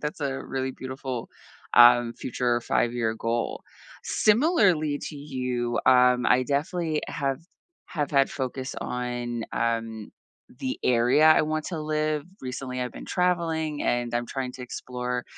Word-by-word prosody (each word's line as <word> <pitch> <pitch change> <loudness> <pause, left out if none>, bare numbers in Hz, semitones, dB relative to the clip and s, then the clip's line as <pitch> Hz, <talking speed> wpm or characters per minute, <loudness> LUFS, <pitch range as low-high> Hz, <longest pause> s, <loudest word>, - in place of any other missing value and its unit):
that's 150 +1 -4
a 135 -1 -2
really 130 0 -3
beautiful, 130 -2 -6 0.5
um, 120 0 +7
future 120 -1 -1
5 120 - +1
year 115 -2 0
goal. 115 +1 -2 0.4
Similarly 205 - +3
to 150 - -9
you, 125 -4 -2
um, 125 -1 +5
I 125 +1 +4
definitely 155 +3 -1
have 135 0 -2 0.5
have 145 -3 -3
had 140 -2 +3
focus 130 -1 -4
on, 120 -1 -3
um, 115 -2 -2 0.5
the 130 -1 -3
area 125 +5 +4
I 155 - +7
want 155 0 -2
to 165 -4 -4
live. 155 -1 -1 0.2
Recently, 125 0 -5
I've 125 - -4
been - - -9
traveling, 165 -4 0
and 120 -1 0
I'm 120 0 -1
trying 130 -2 -4
to 125 - -9
explore 125 0 -4
130 Hz, 140 wpm, -26 LUFS, 120-150 Hz, 0.5 s, um